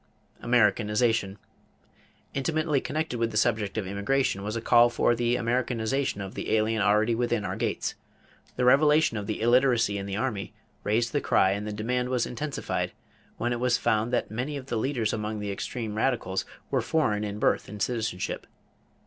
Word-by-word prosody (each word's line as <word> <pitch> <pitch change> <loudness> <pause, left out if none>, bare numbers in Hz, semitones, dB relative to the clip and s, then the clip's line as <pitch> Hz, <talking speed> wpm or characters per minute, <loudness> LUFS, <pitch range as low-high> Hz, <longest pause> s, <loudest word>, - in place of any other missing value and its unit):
=Americanization.= 110 -2 +2 1.0
Intimately 155 0 0
connected 155 -4 -3
with 115 0 +1
the 105 - -3
subject 110 -2 +1
of 110 - -1
immigration 100 +3 0
was 105 +2 -4
a - - -1
call 120 +1 +5
for 120 - +2
the 120 0 +1
"Americanization" 120 0 -1
of 95 -1 -6
the - - -4
alien 110 0 +1
already 105 +3 +3
within 120 -2 0
our 95 +1 -3
gates. - - -2 0.6
The 125 - 0
revelation 150 +1 +5
of 105 -2 -4
the 110 - -3
illiteracy 120 -3 +3
in 100 - -5
the 100 - -3
army 110 -5 -3 0.3
raised 115 +3 +1
the 145 - +1
cry 95 - +3
and 100 +2 -3
the - - -3
demand 125 +4 -1
was 125 -2 +1
intensified 145 +4 -3 0.4
when 120 +1 0
it 120 - -3
was 125 -1 +2
found 110 +2 +1
that 125 - -1
many 130 +6 -3
of 135 - -8
the 130 - -3
leaders 115 -2 0
among 105 0 -3
the 105 -1 -3
extreme 110 +2 -4
radicals 110 -4 0 0.3
were - - +2
foreign 105 -10 +1
in 105 -1 -4
birth - - +1
and 105 +1 -8
citizenship. 110 -4 -2
115 Hz, 175 wpm, -27 LUFS, 105-125 Hz, 1.0 s, call